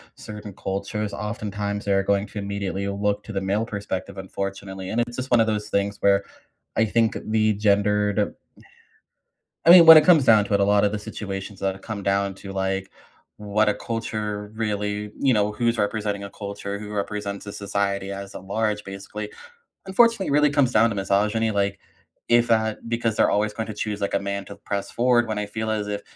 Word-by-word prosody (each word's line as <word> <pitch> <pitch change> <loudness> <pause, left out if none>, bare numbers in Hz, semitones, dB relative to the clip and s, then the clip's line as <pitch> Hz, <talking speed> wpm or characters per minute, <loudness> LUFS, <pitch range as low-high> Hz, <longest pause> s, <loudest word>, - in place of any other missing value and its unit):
certain 105 -1 -9
cultures, 100 +2 -3
oftentimes 105 -1 -4
they're 100 -1 +2
going 100 0 +1
to 105 - -7
immediately 100 -1 -3
look 100 +1 -1
to - - -8
the 95 - -1
male 100 +3 0
perspective 100 -3 -5
unfortunately, 95 0 -5
and 120 - +1
it's 120 0 -4
just 130 +1 -4
one 120 - +4
of 115 - +5
those 105 -1 -2
things 100 0 0
where 100 0 +4 0.5
I 115 - +3
think 115 +1 +1
the 110 0 +2
gendered... 105 0 +1 1.3
I 165 - +7
mean, 175 -1 +10
when 160 0 +12
it 155 - +7
comes 160 -5 +6
down 110 -4 +6
to 100 - -1
it, 100 - +3
a - - +4
lot 100 0 +3
of 105 - +1
the 105 - -2
situations 100 -2 -6
that 95 0 -2
come 110 -3 -5
down 100 0 0
to, 100 0 -9
like, 95 0 -2 0.5
what 105 +1 +1
a 105 - +2
culture 105 -2 -4
really 105 -1 -2
you 135 -2 +3
know, 105 -1 +2
who's 115 +1 0
representing 105 -1 -1
a 100 - -8
culture, 100 0 -6
who 105 0 -8
represents 100 0 -4
a 100 - -6
society 100 -1 -2
as 100 0 -7
a - - -5
large 105 +2 -2
basically, 100 +2 -7 0.6
unfortunately 230 +2 +3
really 150 +1 +4
comes 140 -3 +2
down 115 0 +4
to 110 - -4
misogyny. 105 +3 +1
Like, 100 -1 -1 0.5
if, 120 0 +4
uh, 110 -1 +2
because 115 -1 -1
they're - - +3
always 105 +1 +1
going 110 0 -4
to 110 - -5
choose, 105 0 -4
like, 100 - -1
a - - +2
man 100 0 -4
to 100 - -10
press 100 0 -4
forward 120 -1 +3
when 110 -1 -3
I 105 - -2
feel 110 +2 -4
as 105 -1 -2
if 105 0 -3
105 Hz, 200 wpm, -24 LUFS, 100-110 Hz, 1.3 s, when